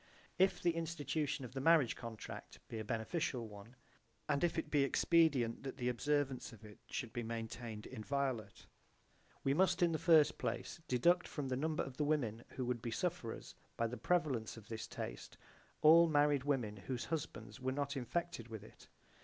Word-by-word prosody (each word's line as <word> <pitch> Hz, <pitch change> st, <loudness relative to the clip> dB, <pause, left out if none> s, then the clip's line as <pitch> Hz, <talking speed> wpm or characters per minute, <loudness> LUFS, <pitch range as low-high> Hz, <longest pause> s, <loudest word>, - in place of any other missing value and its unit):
If 190 Hz, +1 st, +4 dB
the 175 Hz, -, +4 dB
institution 155 Hz, -4 st, -2 dB
of 125 Hz, -, -10 dB
the 135 Hz, -, -3 dB
marriage 160 Hz, -4 st, +5 dB
contract 115 Hz, -2 st, -8 dB
be 115 Hz, -, -4 dB
a -, -, -3 dB
beneficial 115 Hz, -, -2 dB
one, 105 Hz, +3 st, -12 dB, 0.5 s
and 145 Hz, 0 st, +1 dB
if 170 Hz, -1 st, +2 dB
it 160 Hz, -, -2 dB
be 145 Hz, -2 st, +4 dB
expedient 140 Hz, -5 st, +3 dB
that 135 Hz, -1 st, -6 dB
the 125 Hz, -2 st, 0 dB
observance 135 Hz, +1 st, 0 dB
of 115 Hz, -2 st, -13 dB
it 105 Hz, -1 st, -13 dB
should 120 Hz, -2 st, -4 dB
be 120 Hz, -, -2 dB
maintained 115 Hz, -1 st, -5 dB
inviolate, 130 Hz, -1 st, -3 dB, 0.8 s
we 135 Hz, -, +3 dB
must 185 Hz, +3 st, +3 dB
in 170 Hz, -, +4 dB
the 160 Hz, -, -1 dB
first 160 Hz, -4 st, +5 dB
place -, -, -3 dB
deduct 175 Hz, +8 st, +3 dB
from 140 Hz, -3 st, -4 dB
the 130 Hz, -, 0 dB
number 155 Hz, +4 st, 0 dB
of 130 Hz, -2 st, -8 dB
the 150 Hz, -, +1 dB
women 125 Hz, -7 st, 0 dB
who 130 Hz, -, -4 dB
would 120 Hz, -2 st, -1 dB
be 120 Hz, -, -3 dB
sufferers 165 Hz, -4 st, -3 dB, 0.2 s
by 115 Hz, -, +1 dB
the 115 Hz, +2 st, -2 dB
prevalence 130 Hz, -5 st, 0 dB
of 110 Hz, -2 st, -12 dB
this 110 Hz, -1 st, -5 dB
taste -, -, -6 dB, 0.5 s
all 165 Hz, +2 st, +9 dB
married 145 Hz, -2 st, +3 dB
women 120 Hz, -8 st, 0 dB
whose 120 Hz, +5 st, -4 dB
husbands 160 Hz, -3 st, -4 dB
were 130 Hz, 0 st, -1 dB
not 140 Hz, +1 st, -2 dB
infected 140 Hz, +1 st, -2 dB
with 110 Hz, -3 st, -7 dB
it. 110 Hz, -, -15 dB
135 Hz, 180 wpm, -37 LUFS, 115-155 Hz, 0.8 s, all